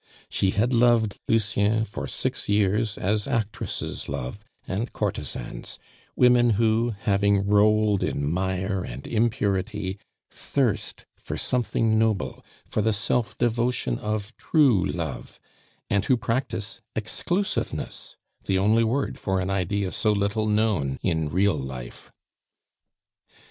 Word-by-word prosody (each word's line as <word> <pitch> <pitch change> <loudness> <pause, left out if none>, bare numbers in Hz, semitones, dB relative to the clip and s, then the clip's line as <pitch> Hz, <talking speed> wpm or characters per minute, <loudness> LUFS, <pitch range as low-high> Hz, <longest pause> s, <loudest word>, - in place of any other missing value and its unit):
She 95 - +1
had 115 +6 +1
loved 115 -3 +3
Lucien 110 0 +2
for 105 - -6
six - - -3
years 105 +1 +2
as 105 +2 0
actresses 115 -6 -3
love 65 +10 -4 0.3
and 105 +6 -2
courtesans - - -4 0.4
women 125 -1 +5
who, 115 0 +2
having 100 -1 +2
rolled 105 0 +4
in 70 - -1
mire 95 +3 -1
and - - -7
impurity, 105 -3 0 0.3
thirst 130 -8 -1
for - - -6
something 115 -3 +1
noble, 110 -4 0 0.2
for - - -1
the 110 +1 +2
self 115 +2 -1
devotion 120 - 0
of 105 +1 -3
true 135 - +3
love, - - -4 0.5
and 100 -1 +1
who 130 - +3
practice 115 -2 -2
exclusiveness 175 - -2 0.3
the 95 - +1
only 110 +4 +4
word 130 +5 -1
for 95 -1 0
an 95 +1 -1
idea 95 +1 -1
so 110 - +1
little 105 +1 0
known 105 -11 +1
in 80 -2 0
real 95 +4 +3
life. 65 -3 -8
105 Hz, 120 wpm, -25 LUFS, 95-115 Hz, 0.5 s, women